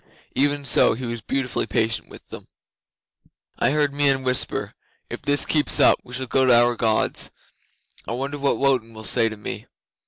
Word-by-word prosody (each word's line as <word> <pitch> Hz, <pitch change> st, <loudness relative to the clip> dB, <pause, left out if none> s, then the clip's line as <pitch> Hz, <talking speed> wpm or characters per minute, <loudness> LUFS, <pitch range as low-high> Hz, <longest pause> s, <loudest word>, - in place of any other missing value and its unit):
Even 145 Hz, 0 st, 0 dB
so, 120 Hz, -, +4 dB
he 125 Hz, +2 st, -6 dB
was 115 Hz, -1 st, -5 dB
beautifully 130 Hz, +1 st, -2 dB
patient 110 Hz, -2 st, -1 dB
with -, -, -14 dB
them. -, -, -10 dB, 1.1 s
'I -, -, +3 dB
heard 145 Hz, -1 st, +1 dB
Meon 140 Hz, -2 st, +2 dB
whisper, 130 Hz, 0 st, -1 dB, 0.4 s
"If -, -, -6 dB
this 145 Hz, +1 st, +1 dB
keeps 150 Hz, -2 st, +1 dB
up -, -, +5 dB
we 125 Hz, -, -9 dB
shall 130 Hz, +1 st, -3 dB
go 130 Hz, +2 st, +1 dB
to 125 Hz, -2 st, +5 dB
our 120 Hz, 0 st, +2 dB
Gods. 110 Hz, -2 st, 0 dB, 0.8 s
I -, -, -3 dB
wonder 140 Hz, +4 st, -4 dB
what 140 Hz, 0 st, 0 dB
Wotan 125 Hz, -5 st, 0 dB
will 110 Hz, -, -9 dB
say 115 Hz, +1 st, +3 dB
to 110 Hz, -, -9 dB
me. 105 Hz, -, -7 dB
130 Hz, 180 wpm, -22 LUFS, 115-140 Hz, 1.1 s, up